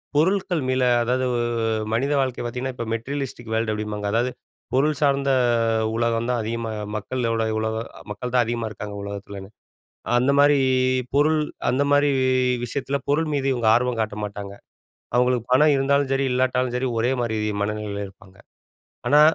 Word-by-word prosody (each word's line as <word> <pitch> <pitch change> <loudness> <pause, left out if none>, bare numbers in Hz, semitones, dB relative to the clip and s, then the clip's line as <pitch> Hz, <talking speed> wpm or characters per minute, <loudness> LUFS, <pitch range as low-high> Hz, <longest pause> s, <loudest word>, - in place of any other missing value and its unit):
பொருட்கள் 180 +1 +2
மேல 130 0 +1 0.2
அதாவது 125 +2 0 0.7
மனித 135 +5 +1
வாழ்க்கை 130 -2 -2
பார்த்தீங்கன்னா, 125 +2 -3
இப்ப 120 - -4
மெட்டீரியலிஸ்டிக் 120 -1 -4
வேர்ல்டு 110 -1 0
அப்டிம்பாங்க 105 -1 -3
அதாவது 120 +3 +1 0.4
பொருள் 145 +3 +2
சார்ந்த 140 -1 +2 0.7
உலகம் 115 0 0
தான் 125 -1 +1
அதிகமா 115 +1 -3 0.2
மக்களோட 115 +1 -1 0.2
உலக 110 0 -1 0.3
மக்கள்தான் 125 +4 0
அதிகமா 115 -1 -2
இருக்காங்க 105 0 -7
உலகத்துலன்னு. 100 -1 -7 0.7
அந்த 130 +3 +3
மாரி 145 0 +5 0.6
பொருள் 155 +2 +4 0.3
அந்த 130 +3 +2
மாரி 145 0 +4 0.6
விஷயத்தில 140 +3 -2
பொருள் 155 +2 +1
மீது 135 -1 0
இவங்க 120 -3 -1
ஆர்வம் 125 -1 0
காட்ட 105 -1 -3
மாட்டாங்க. 100 -1 -6 0.6
அவங்களுக்கு 125 -1 +2
பணம் 150 +3 +5
இருந்தாலும் 140 0 +1
சரி, 135 0 +1
இல்லாட்டாலும் 125 -1 +1
சரி, 130 +1 -1
ஒரே 120 +3 +1
மாரி 110 -2 -1 0.3
மனநிலையில 105 -1 -3
இருப்பாங்க. 100 0 -18 0.7
ஆனா 145 +1 +6
125 Hz, 140 wpm, -23 LUFS, 110-135 Hz, 0.7 s, ஆனா